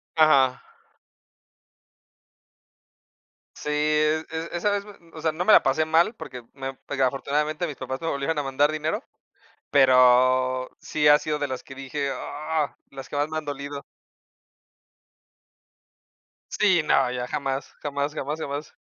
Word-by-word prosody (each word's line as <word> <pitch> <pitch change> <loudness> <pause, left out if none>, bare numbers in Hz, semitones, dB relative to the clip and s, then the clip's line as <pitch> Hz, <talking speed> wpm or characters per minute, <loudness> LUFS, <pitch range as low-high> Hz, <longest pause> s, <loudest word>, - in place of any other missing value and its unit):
Ajá. 140 -5 +4 2.9
Sí, - - -6
e 155 +1 +2
e 160 +1 -4
esa 190 +4 +1
vez, 205 0 -1 0.3
o 155 - -9
sea, 160 - +1
no 175 +4 -3
me 215 - +6
la - - +8
pasé 140 +4 +2
mal 165 +7 +3
porque 125 - -9
me 135 -1 -5
porque 135 0 -3
afortunadamente, 150 +5 -1
mis 150 - -6
papás 130 +2 -5
me 165 - -3
volvieron 140 +2 -1
a - - -1
mandar 140 +2 +2
dinero, 155 +1 -2 0.7
pero, 130 -1 +4
sí 150 -1 -1
ha 150 - +8
sido 150 0 -2
de 145 -1 -2
las 130 -1 -5
que 135 - -11
dije: 135 +1 -3
"¡Ah!", 155 -3 -3
las 135 -1 -9
que - - -5
más 145 +1 +1
me 155 0 -3
han 155 - -5
dolido. 140 0 -6 2.8
Sí, 185 -6 +4
no, 135 -4 +3
ya 125 0 -3
jamás, 135 +1 -3
jamás, 145 0 -2
jamás, 150 +1 -3
jamás. 145 0 -5
145 Hz, 145 wpm, -25 LUFS, 135-155 Hz, 2.9 s, la